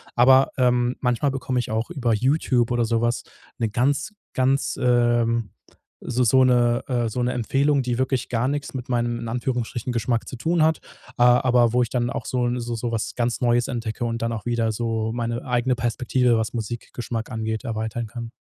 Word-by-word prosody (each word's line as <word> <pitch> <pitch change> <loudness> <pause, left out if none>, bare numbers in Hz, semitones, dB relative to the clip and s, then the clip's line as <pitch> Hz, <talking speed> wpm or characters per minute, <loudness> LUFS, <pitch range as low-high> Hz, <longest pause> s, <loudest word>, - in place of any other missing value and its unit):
Aber, 130 +2 +6
ähm, 125 0 +2
manchmal 125 +2 +1
bekomme 130 -1 -2
ich 120 - -3
auch 110 +1 -1
über 120 -4 0
YouTube 125 0 +1
oder 120 -1 +2
sowas 120 +1 0 0.4
'ne 115 -2 0
ganz, 140 - 0 0.2
ganz, 135 +2 +1
ähm 120 -2 +2 0.5
so 125 +1 0
so 130 +3 +5
'ne, 120 -1 +3
äh 120 -3 0
so 125 +3 -3
'ne 125 - +1
Empfehlung, 135 +3 +1
die 120 -1 -1
wirklich 130 -1 0
gar 120 +1 0
nichts 145 -1 -3
mit 125 -1 -6
meinem, 120 -1 0
in 115 -1 -5
Anführungsstrichen, 120 0 -2
Geschmack 115 0 -1
zu - - -6
tun 165 +6 +1
hat, 160 0 +2 0.4
ah, 125 0 +6
aber 120 -2 +4
wo 125 0 +4
ich 115 - -4
dann 120 -1 0
auch - - -4
so 125 -1 -1
'n 120 +1 -1
so 120 0 -4
so 115 +1 -3
was 110 -1 -3
ganz 120 -1 -1
Neues 120 +1 +2
entdecke 115 -1 -4
und 115 0 -3
dann 115 0 -1
auch 110 - -6
wieder 115 -2 0
so 110 -1 -2
meine 120 0 -3
eigene 125 0 +1
Perspektive, 120 0 +1
was 110 -1 -1
Musikgeschmack 120 +1 -5
angeht, 110 0 -3
erweitern 110 -1 -3
kann. 115 +1 -7
120 Hz, 195 wpm, -23 LUFS, 115-125 Hz, 0.5 s, Aber